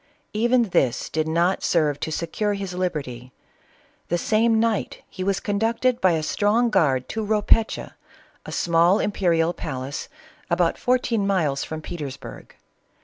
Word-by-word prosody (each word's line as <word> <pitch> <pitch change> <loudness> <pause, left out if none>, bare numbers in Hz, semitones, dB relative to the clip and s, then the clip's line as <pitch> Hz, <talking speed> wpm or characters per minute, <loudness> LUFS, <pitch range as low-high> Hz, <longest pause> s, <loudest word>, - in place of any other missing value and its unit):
Even 235 +1 +2
this 130 -8 +1
did 160 0 -1
not 170 +4 +1
serve 150 -4 +1
to 160 - -3
secure 185 +6 -1
his 195 -2 -5
liberty. 140 -9 -4 0.8
The 175 - 0
same 225 +4 +2
night 225 -2 -1
he 185 - -6
was 195 0 0
conducted 230 +4 0
by 185 -2 +4
a 160 -1 -1
strong 215 +8 +1
guard 140 -10 +2
to 220 - -3
Ropscha, 215 +1 +1 0.5
a - - -9
small 170 +3 +3
im 210 - 0
perial 170 -3 +1
palace, 135 -3 -5 0.4
about 170 -1 +1
fourteen 245 -5 +1
miles 155 -9 +1
from 155 0 -6
Petersburg. 145 -7 -8
180 Hz, 145 wpm, -23 LUFS, 160-215 Hz, 0.8 s, by